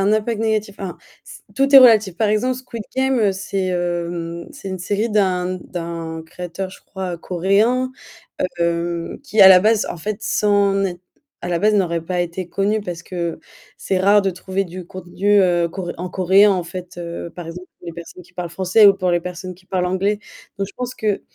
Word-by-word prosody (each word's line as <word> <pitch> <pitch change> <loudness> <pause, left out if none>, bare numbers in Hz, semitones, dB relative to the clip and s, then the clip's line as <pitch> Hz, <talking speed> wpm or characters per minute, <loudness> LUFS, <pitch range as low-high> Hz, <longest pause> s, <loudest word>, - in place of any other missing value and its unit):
un 205 +2 +3
impact 215 +1 0
négatif. 215 -2 -1
Enfin, 190 -3 -5 0.3
c - - -12 0.2
tout 275 +1 +2
est 270 - +13
relatif. 220 -7 +6
Par 215 +1 +1
exemple, 235 +5 +1
Squid 235 -4 -8
Game, 265 0 +2
heu, 210 -3 +3
c'est, 195 0 -3
hem, 170 -1 -3
c'est 275 -9 -8
une 190 -1 -4
série 205 +5 -1
d'un 185 -3 +1
d'un 165 -2 -6
créateur, 180 +3 -6
je - - -14
crois, 185 -3 -6
coréen, 200 +9 +1 0.7
heu, 170 0 -1
qui, 220 -7 +2
à 190 - +11
la 185 -1 +9
base, 215 +2 +3
en - - -5
fait, 205 +5 -4
sais 210 - 0
Net 195 -3 +2 0.4
à - - -5
la 170 -1 0
base 215 +2 +3
n'aurait 170 -4 +1
pas 180 +1 -1
été 175 +1 -4
connu 205 +4 0
parce 175 -4 -6
que 170 -2 -4 0.4
c'est 190 - -1
rare 200 +2 +5
de 195 - +1
trouver 190 +2 -3
du 180 -1 -9
contenu, 190 +3 +1
heu, 175 -2 +2
cor 180 0 -5
en 180 +2 -5
coréen 190 +3 +5
en 180 -2 0
fait, 180 +1 -8
heu, 170 0 -6
par 175 -2 -7
exemple, 180 +2 -8
pour - - -16
les 170 - -5
personnes 170 +2 -10
qui 180 - -23
parlent 175 -1 -5
français 190 +5 +5
ou 195 - +6
pour 185 -2 0
les 175 - +2
personnes 180 +1 -7
qui 185 +1 -23
parlent 180 -1 0
anglais. 195 +3 0 0.4
Donc 195 - -1
je 200 - -14
pense 250 0 -5
que, 210 -2 -1
185 Hz, 210 wpm, -20 LUFS, 175-205 Hz, 0.7 s, est